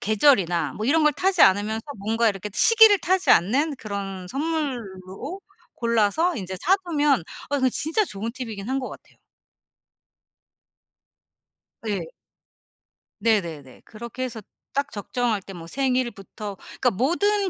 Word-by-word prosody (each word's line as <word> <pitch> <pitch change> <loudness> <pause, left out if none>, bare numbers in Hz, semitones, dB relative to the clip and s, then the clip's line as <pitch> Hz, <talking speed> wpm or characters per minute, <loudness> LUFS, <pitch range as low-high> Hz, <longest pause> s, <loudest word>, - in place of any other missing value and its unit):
계절이나 195 - +2
뭐 215 - -4
이런 315 +6 +3
걸 300 -1 +3
타지 375 +1 +1
않으면서 210 +3 +4
뭔가 225 +3 +1
이렇게 205 0 -4
시기를 445 - +6
타지 375 +1 +1
않는 275 - +3
그런 195 -4 -6
선물로 270 - -4 0.3
골라서 235 - +1
인제 190 -2 -5
사두면 310 - +2 0.3
어 285 - 0
그 260 0 +3
진짜 320 - 0
좋은 220 - -5
팁이긴 225 -5 -6
한 265 +1 0
것 255 - -5
같아요. - - -14 2.7
예. 195 -5 -2 1.2
네 220 -1 +3
네네. 145 -7 -10
그렇게 235 +3 -7
해서 235 -3 -5 0.3
딱 280 +1 -1
적정할 220 +1 -2
때 195 - -11
뭐 165 -2 -9
생일부터 235 -4 -2 0.3
그니까 250 - +4
모든 380 - +1
235 Hz, 265 characters per minute, -24 LUFS, 200-295 Hz, 2.7 s, 시기를